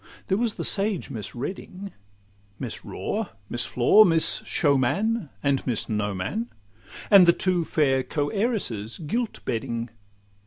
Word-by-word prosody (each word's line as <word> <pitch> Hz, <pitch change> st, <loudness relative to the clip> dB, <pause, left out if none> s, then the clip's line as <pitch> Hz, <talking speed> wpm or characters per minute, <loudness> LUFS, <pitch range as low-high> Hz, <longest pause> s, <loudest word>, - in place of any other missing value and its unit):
There 190 Hz, -, +2 dB
was 235 Hz, -3 st, 0 dB
the -, -, -4 dB
sage 200 Hz, -6 st, 0 dB
Miss 110 Hz, -3 st, -6 dB
Reading, 185 Hz, +8 st, -6 dB, 0.7 s
Miss -, -, -4 dB
Raw, -, -, -3 dB, 0.2 s
Miss 120 Hz, 0 st, 0 dB
Flaw, 125 Hz, -, +6 dB
Miss 165 Hz, -5 st, +4 dB
Showman, 160 Hz, -, +1 dB
and 140 Hz, -1 st, 0 dB
Miss 120 Hz, -4 st, 0 dB
Knowman. 105 Hz, +1 st, -2 dB, 0.6 s
And 195 Hz, -3 st, +8 dB
the 170 Hz, -, +7 dB
two 180 Hz, -2 st, 0 dB
fair 135 Hz, -5 st, +1 dB
co 145 Hz, +2 st, -2 dB
heiresses 195 Hz, -, -2 dB
Giltbedding. 125 Hz, -, -3 dB
150 Hz, 125 wpm, -25 LUFS, 120-195 Hz, 0.7 s, And